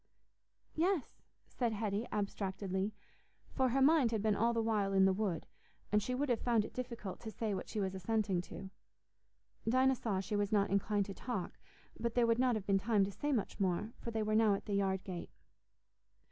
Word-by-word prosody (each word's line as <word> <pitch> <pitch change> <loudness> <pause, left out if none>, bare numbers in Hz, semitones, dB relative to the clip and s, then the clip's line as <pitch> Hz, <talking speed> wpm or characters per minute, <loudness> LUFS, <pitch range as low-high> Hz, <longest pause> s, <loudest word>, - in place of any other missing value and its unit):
"Yes," 345 -1 0 0.3
said 235 -3 -1
Hetty 210 +1 -2
abstractedly, 195 -1 -2 0.6
for 260 -2 +2
her 265 +2 +3
mind 290 -4 +5
had 220 -3 -1
been 215 -2 +3
all 230 +3 +3
the 230 - 0
while 210 -3 +1
in 190 0 +6
the 190 - +4
wood, 185 -5 -1 0.5
and 210 0 +4
she 250 +4 -2
would 285 +3 0
have 240 -3 +1
found 230 -4 +2
it - - -9
difficult 235 -6 -5
to 225 - -6
say 220 -1 -2
what 190 - -4
she 215 - -3
was 190 -2 -1
assenting 195 -1 0
to. 190 +2 -9 1.0
Dinah 260 +2 +4
saw 220 -6 -1
she 205 +3 -3
was 205 -1 0
not 200 -2 +2
inclined 200 +1 +1
to 195 - -6
talk, 215 -3 -4 0.4
but 235 -1 -2
there 240 -1 +4
would 230 +1 +2
not 250 -2 +3
have 210 -3 -3
been 195 -1 +3
time 210 0 +3
to 195 - -2
say 290 +9 -2
much 230 -7 -1
more, 195 +4 0
for - - -5
they 220 -1 -1
were 215 0 0
now 215 -2 +5
at - - -7
the 205 - -3
yard 195 -1 +1
gate. 180 -3 -6
215 Hz, 205 wpm, -35 LUFS, 195-235 Hz, 1.0 s, in